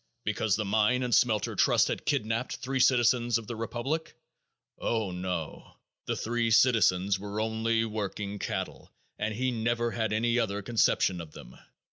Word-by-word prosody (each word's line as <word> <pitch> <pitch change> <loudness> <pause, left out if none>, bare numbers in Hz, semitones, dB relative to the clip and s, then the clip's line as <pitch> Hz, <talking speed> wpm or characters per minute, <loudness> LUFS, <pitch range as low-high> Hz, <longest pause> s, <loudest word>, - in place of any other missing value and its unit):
Because 105 -1 0
the 110 0 -2
Mine 110 +5 +2
and 125 -1 -1
Smelter 110 -4 +2
Trust - - +4
had - - -4
kidnaped 115 +3 -1
three 130 +1 -3
citizens 120 -2 +3
of 115 - -7
the 120 - -6
republic? 120 +8 -3 0.6
Oh, 110 -5 -1
no! 90 -3 -5 0.3
The - - 0
three 115 0 -1
citizens 100 -5 +3
were 105 +1 -5
only 110 +1 0
working 105 -1 -4
cattle - - -5 0.3
and 105 +1 -1
he 130 +3 0
never 120 0 -1
had 110 -3 -1
any 115 +3 +1
other 100 -2 -1
conception 95 -5 +2
of 80 -2 -11
them. - - -12
110 Hz, 155 wpm, -29 LUFS, 105-120 Hz, 0.6 s, Trust